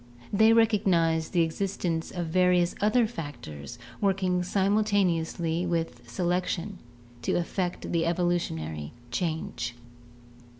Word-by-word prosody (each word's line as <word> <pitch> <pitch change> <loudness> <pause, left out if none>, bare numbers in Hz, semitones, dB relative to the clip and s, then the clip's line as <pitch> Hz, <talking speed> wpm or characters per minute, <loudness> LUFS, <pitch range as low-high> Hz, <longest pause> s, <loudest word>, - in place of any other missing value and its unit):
They 220 +2 +6
recognize 190 -8 +3
the 170 -2 +3
existence 165 -1 -2
of 175 -2 -3
various 180 +1 +3
other 225 +3 +4
factors 120 - -7 0.2
working 185 -2 +2
simultaneously 180 -4 +1
with 165 -8 -3
selection 180 - -1 0.4
to - - 0
effect 175 +1 -2
the 165 -1 +1
evolutionary 80 - -1 0.2
change. 155 -5 -2
175 Hz, 95 wpm, -28 LUFS, 160-195 Hz, 0.4 s, They